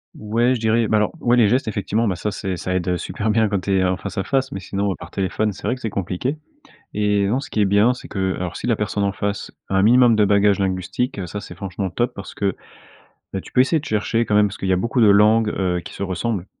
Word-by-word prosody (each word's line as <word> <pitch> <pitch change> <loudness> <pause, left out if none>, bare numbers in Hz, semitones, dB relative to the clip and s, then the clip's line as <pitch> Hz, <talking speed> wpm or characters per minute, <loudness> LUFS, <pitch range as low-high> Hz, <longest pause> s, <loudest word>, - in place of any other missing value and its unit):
Ouais, 115 +4 +1
je - - -4
dirais 110 0 +1
bah 110 - +3
alors, 105 0 +1
ouais 120 +1 +3
les 115 - +5
gestes, 125 +2 +1
effectivement, 105 +2 -1
bah 95 -5 -1
ça, 105 +4 -2
c'est 95 -2 -4
ça 90 +2 -3
aide 90 0 0
super 105 +5 -3
bien 110 0 +3
quand 100 -2 -1
tu 95 0 0
es - - +2
en 90 0 +1
face-à-face, 130 +9 -2
mais 95 - -4
sinon 100 +1 -2
par - - -10
téléphone, 100 +2 -1
c'est - - -14
vrai 125 - +1
que - - -13
c'est 115 - -2
compliqué, 100 - -3 0.6
et 105 -1 +1
non, 120 +6 +1
ce 140 - -6
qui 110 - -2
est - - +5
bien, 100 +5 +4
c'est 125 - -11
que 95 -2 -1
alors, 90 -1 -4
si - - -5
la 115 - +3
personne 105 -1 -1
en 100 - 0
face 100 +1 -3 0.2
à 95 - 0
un 95 - +4
minimum 120 +1 +5
de 105 - +4
bagage 100 0 +3
linguistique, 95 +5 -2
heu, 90 - -4
ça, 105 - -5
c'est 100 - -10
franchement 95 -1 -4
top 120 +6 -1
parce 100 - -9
que, 100 -2 -1 0.8
bah, 95 - -2
tu - - -14
peux 125 - +3
essayer 150 +5 +3
de 150 - -7
chercher 115 +1 0
quand 105 - -1
même, 105 0 +5
parce 100 - -8
qu'il 95 - -4
y - - +3
a - - +3
beaucoup 115 +6 0
de 110 - +6
langues, 105 +2 +5
heu, 90 -3 -1
qui - - -9
se - - -7
ressemblent, 95 +1 -2
105 Hz, 275 wpm, -21 LUFS, 95-115 Hz, 0.8 s, de